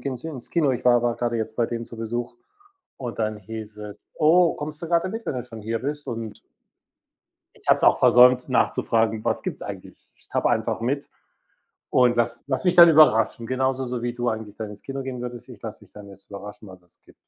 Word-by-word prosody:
gehen 135 -2 -3
s 125 - -11
ins 145 -7 -7
Kino. 155 -5 +2
Ich 125 - -4
war 120 -1 +6 0.2
gerade 120 -1 -1
jetzt 110 -1 -3
bei 120 - +1
denen 115 0 -4
zu 115 - -11
Besuch 120 +2 -4 0.6
und 120 -4 -6
dann 110 -1 -1
hieß 105 +1 -9
es: 105 -1 -9
„Oh, 170 +2 +4
kommst 150 0 -7
du - - -3
gerade 170 +2 +2
mit, 225 +2 -6
wenn - - -2
du 125 - -3
schon 115 -3 -11
hier 115 +1 -3
bist“ 145 +2 -4
und 115 -2 -6 1.2
ich - - -16
habe - - +6
es - - -1
auch - - +5
versäumt 125 +1 +6
nachzufragen: 115 -3 +1
„Was - - -1
gibt's - - -5
eigentlich?“ - - -8 0.2
Ich - - -24
tappe - - 0
einfach - - 0
mit 135 +5 -2 0.8
und 125 -1 +4
lass 120 -1 0
lasse 140 +6 -2
mich 180 - +3
dann 170 -1 +9
überraschen, 120 -7 +4
genauso 130 +1 -1
so 125 -1 -4
wie 120 0 -2
du 120 0 -2
eigentlich 110 -2 -6
dann 110 -2 -6
ins 105 - -12
Kino 135 0 -5
gehen 130 -2 -6
würdest. 120 -1 -7
Ich - - -12
lasse - - -8
mich - - -20
dann 105 -1 -12
jetzt 100 0 -15
überraschen, 105 +1 -9
was 95 -1 -13
es 90 - -20
gibt. - - -21
120 Hz, 225 wpm, -24 LUFS, 110-135 Hz, 1.2 s, dann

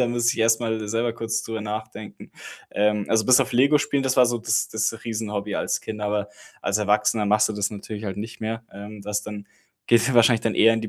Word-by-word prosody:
Da 125 - +3
muss 120 0 +1
ich - - -8
erst 115 +1 +3
mal 110 -2 -2
selber 115 +2 0
kurz 115 -1 -3
drüber 110 -1 -5
nachdenken. 110 0 -7 0.4
Ähm, 105 0 +1
also 110 -1 +2
bis 130 +1 +6
auf 130 -1 -1
Lego 140 +5 +5
spielen, 140 -1 0
das 130 0 0
war 125 - +7
so 120 0 -1
das 115 -1 0
das 110 +1 -2
riesen 110 -2 -4
Hobby 100 0 -3
als - - -1
Kind, 110 -1 -6
aber 105 0 -1 0.3
als 100 - 0
Erwachsener 105 +1 +1
machst 105 +1 +3
du - - -2
das 105 -1 -1
natürlich 105 +1 -7
halt 95 -2 -4
nicht 110 +2 -7
mehr. 115 +1 -4
Ähm, 100 +1 -10
das 105 0 -2
dann 105 -1 -8 0.4
geht 120 0 +4
ja 130 - 0
wahrscheinlich 115 -1 +5
dann 115 - 0
eher 115 +1 +5
in 115 - -1
die 110 - -4
110 Hz, 245 wpm, -24 LUFS, 105-115 Hz, 0.4 s, war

